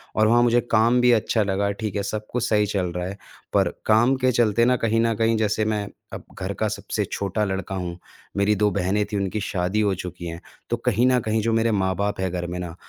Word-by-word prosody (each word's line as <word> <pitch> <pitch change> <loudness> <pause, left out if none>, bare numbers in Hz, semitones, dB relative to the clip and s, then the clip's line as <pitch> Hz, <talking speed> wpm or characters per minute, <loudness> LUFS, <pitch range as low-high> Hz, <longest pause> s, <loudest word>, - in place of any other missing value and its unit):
और 110 0 +4
वहाँ 120 +2 +4
मुझे 120 0 +4
काम 115 +2 +4
भी 125 0 +5
अच्छा 110 -1 +2
लगा। 100 0 0
ठीक 105 -1 -5
है, 100 - 0
सब 105 +1 -4
कुछ 125 -1 -1
सही 105 -1 +3
चल 95 -3 -1
रहा 90 0 -2
है 100 +2 -6 0.4
पर - - +3 0.2
काम 120 +5 +4
के 130 - +4
चलते 115 -1 +3
ना 125 - +4
कहीं 115 -1 +1
न 115 0 +2
कहीं 115 +1 +2
जैसे 110 0 0
मैं 105 -2 -1 0.3
अब - - -6 0.2
घर 95 +1 -3
का 110 - -1
सबसे 105 0 -3
छोटा 100 +2 -1
लड़का 95 -1 -3
हूँ, 90 -2 -4 0.4
मेरी 100 +1 +3
2 105 +1 +2
बहनें 100 +2 0
थीं, 105 0 -4
उनकी 100 +2 -2
शादी 95 +1 -1
हो 100 -2 +2
चुकी 90 -1 -7
हैं। 85 +1 -7 0.3
तो 120 - 0
कहीं 120 -1 +1
न 125 -1 +4
कहीं 110 0 -1
जो 115 +1 0
मेरे 115 0 +2
माँ-बाप 100 0 0
हैं 95 -2 -1
घर 90 -1 -3
में 90 +1 -5
ना, 85 -2 -6
105 Hz, 240 wpm, -23 LUFS, 95-115 Hz, 0.4 s, भी